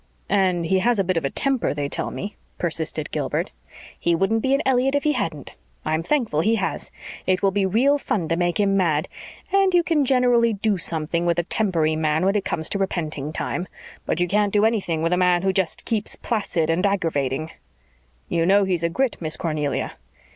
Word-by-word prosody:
"And 185 -4 +2
he 190 +3 +2
has 235 +4 +2
a 195 - +2
bit 185 0 -1
of 165 - 0
a - - +1
temper, 270 - 0
they 145 -1 -2
tell - - -2
me," 200 +1 -6 0.2
persisted 160 -2 -2
Gilbert. - - -2 0.5
"He 170 - +2
wouldn't 205 +6 +1
be 265 +3 +2
an 280 - -1
Elliott 265 +1 +2
if 285 - +1
he 300 - +3
hadn't. 165 - -3 0.3
I'm 155 +1 0
thankful 215 - 0
he 220 +6 +2
has. 195 -3 -3 0.4
It 185 +1 +1
will 195 - +4
be 195 0 +1
real 265 +9 +3
fun 180 - -1
to 165 - +2
make 175 +1 0
him 200 -1 +2
mad. 160 -6 +1 0.5
And 390 -2 +4
you 350 - +5
can 320 -4 +2
generally 245 -3 +3
do 205 -1 0
something 165 +1 0
with 170 -1 +2
a 175 - +1
tempery 170 -5 +1
man 155 +2 +1
when 195 +2 +2
it 205 - +1
comes 160 - 0
to 200 - -2
repenting 155 -6 -2
time. 175 +3 -3 0.4
But - - 0
you 175 - +2
can't 205 +2 +1
do 210 +1 +3
anything 190 -8 0
with 165 +2 +1
a - - +2
man 180 -1 +3
who 190 0 +2
just 190 -3 -1
keeps 220 -3 -1
placid 180 -8 -1
and 170 +3 0
aggravating." 160 -7 0 0.8
"You 165 0 0
know 200 +1 +5
he's 185 -3 0
a 170 - +1
Grit, 260 +8 0
Miss 155 -2 -2
Cornelia." 150 -4 -2
185 Hz, 210 wpm, -23 LUFS, 165-220 Hz, 0.8 s, you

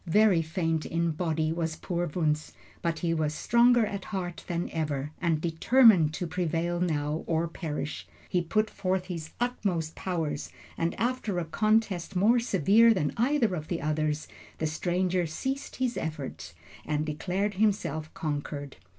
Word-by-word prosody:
Very 200 -1 +5
faint 160 -1 -1
in 170 0 0
body 160 -1 0
was 165 -1 -2
poor 175 +1 -2
Wunzh, 155 -1 -1 0.3
but 165 -1 -1
he 165 - +2
was 155 -2 0
stronger 240 +2 +4
at 200 -2 -5
heart 180 -4 -4
than 175 0 -1
ever, 150 -3 -2
and 165 -3 +2
determined 175 +1 +5
to 180 - -3
prevail 175 0 -1
now 155 -3 -1
or 165 0 +1
perish. 155 -3 -5 0.2
He 180 - +1
put 215 +6 +1
forth 185 -2 -1
his 165 -4 -5
utmost 190 -10 -1
powers, 160 -6 -3 0.3
and 165 0 -2
after 235 -5 -1
a 175 - -1
contest 205 0 +1
more 220 +7 +4
severe 225 - +5
than 150 -6 0
either 240 -3 +2
of 155 -3 -4
the 170 - -2
others, 155 0 -1 0.3
the 160 - -1
stranger 175 +3 0
ceased 265 - -4
his 255 -2 -1
efforts 150 - -5 0.3
and 150 0 -1
declared 180 +7 -1
himself 185 -7 0
conquered. 145 -2 -4
170 Hz, 150 wpm, -28 LUFS, 155-200 Hz, 0.3 s, Very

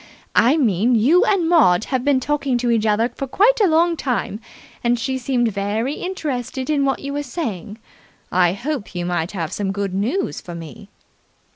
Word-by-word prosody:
I 260 +7 +4
mean 235 - +2
you 280 - +4
and 375 -5 +2
Maud 220 - +4
have 260 -1 -2
been 285 -1 +3
talking 280 -1 -1
to 240 0 0
each 220 -1 +1
other 220 +3 +2
for 275 - -6
quite 450 - +3
a 405 - +5
long 335 +1 +3
time, 250 -7 -2 0.4
and 240 0 +2
she 260 +3 -2
seemed 245 -2 0
very 210 +7 -2
interested 285 -7 -4
in 285 -2 +2
what 270 - 0
you 280 0 -5
were 290 - -2
saying. 230 - -5 0.5
I 180 -1 +3
hoped 245 -2 -5
you 175 0 -2
might 175 0 -2
have 170 -4 -3
some 200 -2 -2
good 200 -1 -3
news 235 - -1
for 175 - -8
me." 170 +6 -10
245 Hz, 185 wpm, -20 LUFS, 205-290 Hz, 0.5 s, a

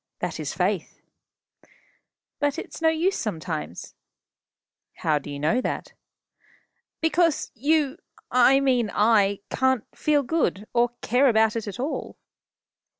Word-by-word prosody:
That - - -4
is - - -3
faith." - - -1 1.4
"But 290 -1 0
it's - - -7
no 320 - +5
use 335 +5 +1
sometimes." 160 - -5 1.0
"How 155 -2 +1
do 145 - -10
you 145 - -5
know 155 - +1
that?" - - -4 1.1
"Because 325 0 +1
you 290 +4 +1 0.3
I 255 +2 +5
mean 250 -5 +2
I 205 -2 +3
can't 260 -3 +1
feel 295 -2 +2
good, 230 - -1
or 240 0 +3
care 255 +4 +3
about 220 -1 +3
it 225 -2 -3
at 205 +4 -6
all." 280 +5 -4
245 Hz, 125 wpm, -25 LUFS, 210-290 Hz, 1.4 s, no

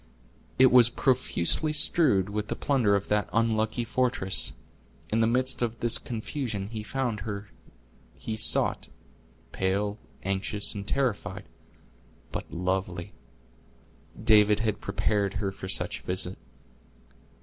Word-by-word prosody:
It 130 0 +6
was 120 -1 +7
profusely 130 - +1
strewed 150 - +3
with 105 0 -3
the - - -3
plunder 125 -8 +2
of 100 0 -2
that 105 0 +1
unlucky 110 +1 0
fortress. 120 -5 0 0.6
In 110 - +1
the 115 - +3
midst 130 +2 +1
of 115 -1 -2
this 115 -1 +5
confusion 110 -3 -4
he 110 -1 -5
found 120 -1 -2
her 105 -1 -6 0.7
he 110 +11 -5
sought, 110 - +3 0.6
pale, 100 +3 -1 0.2
anxious 100 +1 -1
and 100 -1 -7
terrified, 105 -7 -1 0.9
but - - -6
lovely. 90 0 -3 1.1
David 105 0 +5
had 110 -2 -1
prepared 100 0 -1
her 100 -1 -2
for 95 -1 -8
such 95 - 0
a - - -22
visit. 90 0 -3
105 Hz, 125 wpm, -27 LUFS, 100-120 Hz, 1.1 s, was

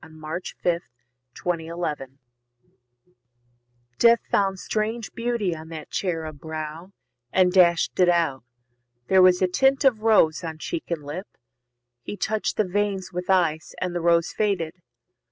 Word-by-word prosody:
Sigourney 155 +2 -6 0.2
Death 170 -1 +1 0.6
of 180 - +3
an 170 - -6 0.2
Infant 135 -4 -4 1.8
Death 235 0 +6
found 195 -1 +2
strange 220 +4 -2
beauty 230 -7 -1
on 160 0 -10
that 160 -2 -8
cherub 160 -5 -3
brow, 160 +4 -6 0.4
And 185 -1 +4
dash'd 175 -2 +4
it 180 -1 +5
out. 165 -8 +1 0.7
There 190 -1 +6
was 185 0 +5
a - - +4
tint 270 +9 +2
of 235 -5 +4
rose 195 -7 +4
On 160 -2 -5
cheek 325 - -5
and 165 -4 -3
lip; 160 +8 -6 0.7
he 205 - -7
touch'd 215 +2 -1
the 215 - +2
veins 195 -1 -1
with 180 +1 -5
ice, 170 -4 +1
And 180 -1 -2
the 175 - -2
rose 170 0 +3
faded. 195 -7 -1
180 Hz, 145 wpm, -24 LUFS, 160-205 Hz, 1.8 s, Death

